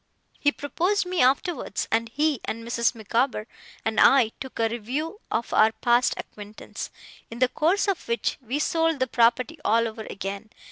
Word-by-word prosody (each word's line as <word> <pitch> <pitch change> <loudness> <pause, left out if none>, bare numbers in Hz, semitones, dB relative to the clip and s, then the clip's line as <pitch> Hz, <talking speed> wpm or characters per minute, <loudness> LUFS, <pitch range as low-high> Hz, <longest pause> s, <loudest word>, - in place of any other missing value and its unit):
He 290 - +3
proposed 360 +8 0
me 360 -1 0
afterwards; 265 - +1
and 230 +1 +1
he, 295 0 0
and 230 +1 -5
Mrs. 235 0 +1
Micawber, 230 +1 0 0.4
and 220 0 0
I, 260 -5 +6
took 265 - -8
a 225 - +2
review 265 - -4
of 230 - -2
our 220 +1 +5
past 240 +2 +2
acquaintance, 210 0 -8 0.4
in 230 - -8
the 255 +1 +4
course 335 - +1
of 395 -3 -1
which 235 0 -1
we 250 +4 -2
sold 325 0 +1
the 260 - +2
property 255 +6 +2
all 230 +1 +3
over 220 0 -7
again. 195 +2 -5
245 Hz, 170 wpm, -25 LUFS, 225-300 Hz, 0.4 s, I